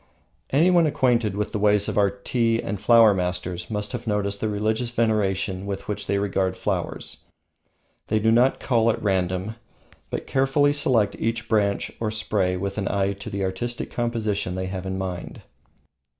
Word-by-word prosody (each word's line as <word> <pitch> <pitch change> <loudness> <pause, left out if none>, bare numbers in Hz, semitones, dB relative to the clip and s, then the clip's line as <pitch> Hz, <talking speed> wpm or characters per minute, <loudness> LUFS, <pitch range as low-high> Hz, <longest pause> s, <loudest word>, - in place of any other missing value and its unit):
Anyone 170 +3 +4
acquainted 120 -7 +1
with 105 0 -2
the 105 - -2
ways 105 0 +3
of - - -2
our 100 -1 +4
tea 115 -1 0
and 100 -3 -4
flower 115 -1 +6
masters 90 -1 -3
must 105 -1 -3
have 120 -1 -6
noticed 100 -1 -1
the 110 - 0
religious 110 +3 -1
veneration 100 -4 0
with 100 -1 -5
which 105 - -3
they 100 - +1
regard 95 -2 0
flowers. - - -3 0.9
They 110 - +1
do 110 +1 +2
not 125 +3 +3
cull 115 -3 +2
at 110 - 0
random, 95 +2 -1 0.5
but - - -4
carefully 135 +2 +2
select 125 -8 +2
each 115 +1 -2
branch 100 -3 +1
or 110 - -1
spray 100 -4 0
with 100 +2 -3
an 95 - -2
eye 100 0 0
to 100 - -8
the 100 0 -3
artistic 95 +6 -3
composition 110 -6 -2
they 95 0 -2
have 95 0 -5
in 95 0 -3
mind. 95 -2 -5
105 Hz, 170 wpm, -24 LUFS, 95-115 Hz, 0.9 s, flower